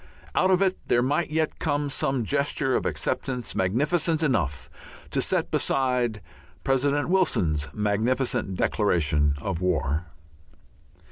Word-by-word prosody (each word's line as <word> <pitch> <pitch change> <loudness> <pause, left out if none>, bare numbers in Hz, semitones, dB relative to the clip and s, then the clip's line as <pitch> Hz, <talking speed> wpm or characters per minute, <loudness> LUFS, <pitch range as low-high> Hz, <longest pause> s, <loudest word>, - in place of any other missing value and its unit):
Out 185 - +3
of 190 +1 +4
it 190 -1 0
there 120 - +3
might 145 +6 0
yet 155 0 -1
come 145 -2 0
some 135 -3 0
gesture 140 0 0
of - - 0
acceptance 125 -5 -2
magnificent 150 - +1
enough 110 - 0 0.4
to - - +1
set - - 0
beside 125 -5 0 0.4
President 140 +2 +1
Wilson's 85 - +1
magnificent 110 - 0
declaration 75 -8 +1
of 95 -1 -3
war. 80 -2 0
125 Hz, 120 wpm, -25 LUFS, 95-145 Hz, 0.4 s, of